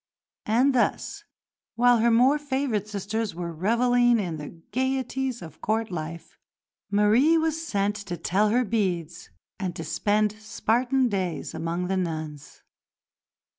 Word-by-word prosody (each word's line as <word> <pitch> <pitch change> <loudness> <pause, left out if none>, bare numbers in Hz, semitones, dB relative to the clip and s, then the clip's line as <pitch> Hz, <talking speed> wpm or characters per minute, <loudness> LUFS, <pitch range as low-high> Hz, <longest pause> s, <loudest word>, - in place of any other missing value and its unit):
And 250 +6 +3
thus, 245 - 0 0.5
while 245 0 +5
her 235 +2 +4
more 255 +6 +4
favoured 265 -7 -1
sisters 210 0 -3
were 170 -1 -4
revelling 240 +6 +3
in 175 -7 -2
the 150 +2 -9
gaieties 260 -2 -1
of 160 - -12
Court 220 0 -1
life, 165 0 -7 0.5
Marie 215 +10 +4
was 320 0 0
sent 205 -6 0
to 175 -2 -4
tell 195 +6 +1
her 245 +3 +2
beads 180 -6 -2 0.3
and 185 -3 -3
to - - -5
spend 210 0 +1
Spartan 240 +4 +1
days 185 -7 -3
among 165 +2 -2
the 190 +1 -1
nuns. 155 -5 -5
215 Hz, 135 wpm, -26 LUFS, 180-245 Hz, 0.5 s, while